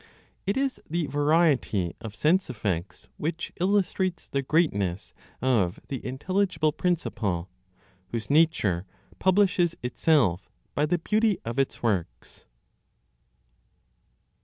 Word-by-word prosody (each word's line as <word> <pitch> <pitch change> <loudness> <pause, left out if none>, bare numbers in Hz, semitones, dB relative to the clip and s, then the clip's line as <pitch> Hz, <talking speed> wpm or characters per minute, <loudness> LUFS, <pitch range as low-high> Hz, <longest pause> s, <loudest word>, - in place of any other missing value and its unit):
It 200 - +1
is 270 -1 -1
the 170 +1 0
variety 145 - +2
of 110 -2 -7
sense 180 +8 +2
effects 100 -5 -3
which 165 +2 -3
illustrates 185 -2 0
the 140 - -1
greatness 100 - 0 0.3
of 110 -8 +2
the 135 - -4
intelligible 180 +4 0
principle, 105 - -1 0.6
whose 110 +2 -4
nature 125 - +2 0.3
publishes 185 -3 +3
itself 125 - +2 0.2
by 150 +1 +1
the 175 - +2
beauty 210 +4 +2
of 115 +3 -3
its 135 - -1
works. 100 -8 -2
150 Hz, 105 wpm, -27 LUFS, 110-175 Hz, 0.6 s, publishes